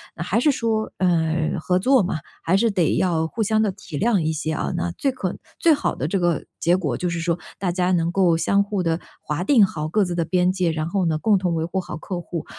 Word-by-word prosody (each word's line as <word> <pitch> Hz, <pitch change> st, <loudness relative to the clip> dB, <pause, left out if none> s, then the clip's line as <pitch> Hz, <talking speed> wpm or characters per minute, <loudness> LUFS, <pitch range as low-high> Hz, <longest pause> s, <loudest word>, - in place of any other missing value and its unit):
那 170 Hz, -, -4 dB
还 200 Hz, +5 st, +1 dB
是 295 Hz, +5 st, +4 dB
说， 225 Hz, -4 st, -1 dB
呃， 160 Hz, -3 st, +1 dB
合 180 Hz, +3 st, +1 dB
作 260 Hz, +5 st, +4 dB
嘛， 175 Hz, -3 st, -2 dB, 0.3 s
还 175 Hz, -, +2 dB
是 230 Hz, +2 st, +2 dB
得 180 Hz, -5 st, +1 dB
要 165 Hz, -3 st, +1 dB
互 220 Hz, +7 st, -2 dB
相 215 Hz, +1 st, +2 dB
地 210 Hz, -, +1 dB
体 170 Hz, -4 st, -8 dB
谅 225 Hz, -3 st, +2 dB
一 160 Hz, -1 st, 0 dB
些 155 Hz, 0 st, -2 dB
啊。 -, -, -2 dB
那 175 Hz, 0 st, -2 dB
最 275 Hz, +8 st, 0 dB
可 190 Hz, -8 st, -4 dB, 0.2 s
最 330 Hz, -2 st, +5 dB
好 290 Hz, -, -1 dB
的 135 Hz, -, -2 dB
这 195 Hz, +4 st, 0 dB
个 175 Hz, -4 st, 0 dB
结 175 Hz, +1 st, +3 dB
果 150 Hz, -10 st, -2 dB
就 180 Hz, -, -2 dB
是 170 Hz, -1 st, -3 dB
说， 170 Hz, +1 st, 0 dB, 0.2 s
大 185 Hz, -2 st, 0 dB
家 180 Hz, +1 st, 0 dB
能 170 Hz, -1 st, +1 dB
够 175 Hz, -4 st, +3 dB
相 200 Hz, +4 st, +2 dB
互 200 Hz, -1 st, -2 dB
地 165 Hz, 0 st, 0 dB, 0.2 s
划 155 Hz, +4 st, -3 dB
定 225 Hz, -1 st, +5 dB
好 155 Hz, -4 st, -4 dB
各 210 Hz, +6 st, +2 dB
自 175 Hz, -1 st, -3 dB
的 170 Hz, -, +1 dB
边 180 Hz, +1 st, +2 dB
界， 185 Hz, -3 st, 0 dB
然 155 Hz, 0 st, -2 dB
后 190 Hz, +1 st, 0 dB
呢， 160 Hz, -2 st, +1 dB
共 205 Hz, +5 st, +3 dB
同 180 Hz, -2 st, -1 dB
维 160 Hz, 0 st, -1 dB
护 180 Hz, +3 st, -2 dB
好 175 Hz, -4 st, -7 dB
客 175 Hz, +2 st, -5 dB
户。 170 Hz, -2 st, -5 dB
180 Hz, 275 characters per minute, -22 LUFS, 165-200 Hz, 0.3 s, 最